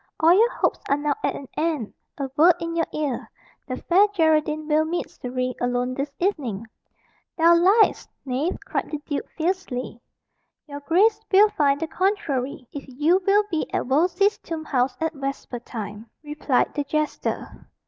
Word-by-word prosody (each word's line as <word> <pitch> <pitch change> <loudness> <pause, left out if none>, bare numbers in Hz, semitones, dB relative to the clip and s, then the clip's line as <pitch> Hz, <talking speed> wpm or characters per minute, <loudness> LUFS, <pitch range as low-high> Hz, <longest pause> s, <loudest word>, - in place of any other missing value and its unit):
All 325 +2 +6
your 445 +6 +5
hopes - - 0
are 280 - +3
now 290 0 0
at - - 0
an 275 - -8
end. 305 -9 -1 0.2
A 275 - -2
word 335 +4 +6
in 335 0 -4
your 330 -1 +1
ear 290 -5 -3 0.4
the 255 -2 -4
Fair 385 +4 +4
Geraldine 310 -5 +1
will 310 0 +3
meet 340 +2 -2
Surrey 255 0 -3
alone 245 +1 0
this 275 +2 -3
evening." 265 - -2 0.7
"Thou 335 +1 +6
liest, 385 +6 +4 0.2
knave!" 275 +7 -1
cried - - -3
the 305 - -3
duke 285 - -4
fiercely. 315 - -3 0.6
"Your 285 -1 -8
grace 405 +9 +3
will 410 +2 +6
find 285 -6 +1
the 325 - -1
contrary, 295 - -2
if 285 - -7
you 300 +8 +2
will 410 +1 +5
be 320 -2 -2
at - - -1
Wolsey's 360 - +2
tomb 320 -2 -6
house 255 -2 0
at 320 0 -1
vesper 275 -3 -5
time," 215 -2 -8
replied 295 -3 0
the 290 - -1
jester. 305 +2 -3
305 Hz, 165 wpm, -24 LUFS, 265-345 Hz, 0.7 s, All